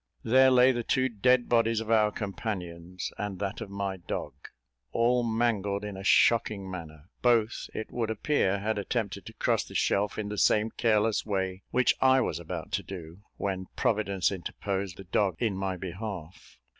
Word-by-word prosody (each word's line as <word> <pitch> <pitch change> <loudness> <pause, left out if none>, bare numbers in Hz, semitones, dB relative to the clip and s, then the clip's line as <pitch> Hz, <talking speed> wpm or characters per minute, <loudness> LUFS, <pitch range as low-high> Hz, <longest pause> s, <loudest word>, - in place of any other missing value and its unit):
There 130 +3 +6
lay 130 0 +6
the 120 -2 -1
two 130 +2 +1
dead 125 +2 +3
bodies 115 -1 +3
of 115 0 -4
our 105 -2 +4
companions, 90 -4 -5
and 105 -2 -3
that 100 +3 -4
of 110 - -6
my 100 -1 -3
dog, 80 -4 -5 0.6
all 120 +1 +3
mangled 110 -4 0
in 105 -2 -5
a 95 - -7
shocking 100 -2 +3
manner; 80 -1 -9
both, 115 -2 +2
it 110 - -5
would 115 -2 -2
appear, 110 -3 +1
had 105 +1 -1
attempted 100 0 -3
to - - -9
cross - - +1
the - - -12
shelf 100 +1 +1
in 105 -1 -3
the 105 -1 -3
same 110 +1 +3
careless 110 -2 +2
way 95 -2 -2
which 125 0 +3
I 130 0 +6
was 130 - -1
about - - -6
to - - 0
do, 85 -2 -9 0.2
when 95 -2 -3
Providence 105 -6 +1
interposed 95 0 -4
the 95 - -9
dog 95 0 +1
in 110 -2 0
my 95 -1 -2
behalf. 95 -1 -7
105 Hz, 175 wpm, -28 LUFS, 95-115 Hz, 0.6 s, There